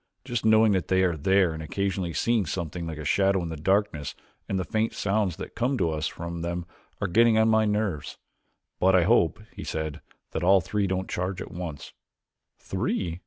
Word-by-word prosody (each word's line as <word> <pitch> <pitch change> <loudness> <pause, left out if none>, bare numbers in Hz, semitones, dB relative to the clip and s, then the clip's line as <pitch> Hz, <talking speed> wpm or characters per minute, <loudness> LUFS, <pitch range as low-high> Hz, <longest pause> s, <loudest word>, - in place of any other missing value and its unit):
Just 120 -2 -2
knowing 110 0 +5
that 95 -3 0
they 95 0 +3
are 90 -2 +2
there 95 +2 +3
and 80 - -6
occasionally 95 +2 -2
seeing 110 +4 +1
something 85 0 -4
like 80 -2 -5
a 75 - -6
shadow 95 +2 +2
in 85 - -4
the 80 - -4
darkness 95 -2 0 0.3
and 95 - 0
the 95 - 0
faint 110 +4 -1
sounds 100 -3 0
that - - -8
come 130 +3 0
to 85 -6 +1
us 75 -1 -1
from 85 0 -6
them 85 0 -3 0.3
are - - 0
getting 115 +4 +4
on 110 0 +4
my 110 0 +4
nerves. 105 -7 -1 0.6
But 95 +1 +4
I 90 - +5
hope," 85 0 +3 0.2
he - - -7
said, 80 -1 -4 0.3
"that 80 - -3
all 95 +2 +6
three 100 +3 -1
don't 95 0 -2
charge 90 +1 -3
at - - -7
once." 80 -5 -7 0.6
"Three?" 85 -2 -2
95 Hz, 200 wpm, -26 LUFS, 85-105 Hz, 0.6 s, all